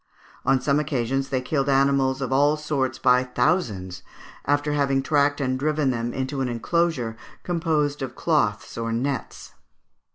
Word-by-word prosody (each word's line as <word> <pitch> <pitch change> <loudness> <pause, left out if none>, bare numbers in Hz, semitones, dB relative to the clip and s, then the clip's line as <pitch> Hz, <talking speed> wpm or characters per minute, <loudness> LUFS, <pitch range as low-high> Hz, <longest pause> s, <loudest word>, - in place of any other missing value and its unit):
On 135 - +4
some 140 +3 +1
occasions 135 -2 -1
they 130 -1 0
killed 135 +1 -1
animals 135 -1 +2
of 130 0 -2
all 145 +3 +3
sorts 145 -3 -1
by 125 -1 +4
thousands, 125 - -1 0.4
after 145 +1 +1
having 140 -2 +1
tracked 145 -1 +2
and 130 -2 -1
driven 150 -1 +1
them 120 -1 -2
into 135 +2 -3
an 130 - -1
enclosure 125 -1 0 0.3
composed 155 -4 0
of 135 - -5
cloths 115 -11 0
or 115 0 -2
nets. 130 +4 -3
135 Hz, 150 wpm, -24 LUFS, 125-145 Hz, 0.4 s, On